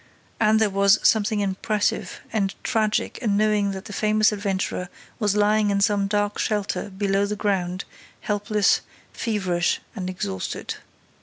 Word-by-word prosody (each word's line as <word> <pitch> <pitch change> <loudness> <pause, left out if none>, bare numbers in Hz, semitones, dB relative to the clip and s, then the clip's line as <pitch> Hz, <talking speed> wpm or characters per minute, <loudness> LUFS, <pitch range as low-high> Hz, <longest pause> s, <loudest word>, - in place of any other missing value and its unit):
And 220 0 +4
there 220 -2 +2
was 200 +1 +5
something 215 -1 +2
impressive 205 +2 -1
and 195 -3 0
tragic 215 -2 0
in 210 -5 +1
knowing 210 -1 +2
that 195 0 -5
the 205 - -8
famous 215 +1 +3
adventurer 195 -3 -2 0.3
was 210 -3 +1
lying 210 0 +3
in 200 0 +1
some 200 -1 +2
dark 205 0 0
shelter, 205 -1 -1
below 195 +1 0
the 210 - -2
ground, 185 -3 -1 0.4
helpless, 205 0 +1 0.3
feverish 185 -6 0 0.2
and 185 -3 -4
exhausted. 95 - -4
205 Hz, 140 wpm, -24 LUFS, 195-215 Hz, 0.4 s, was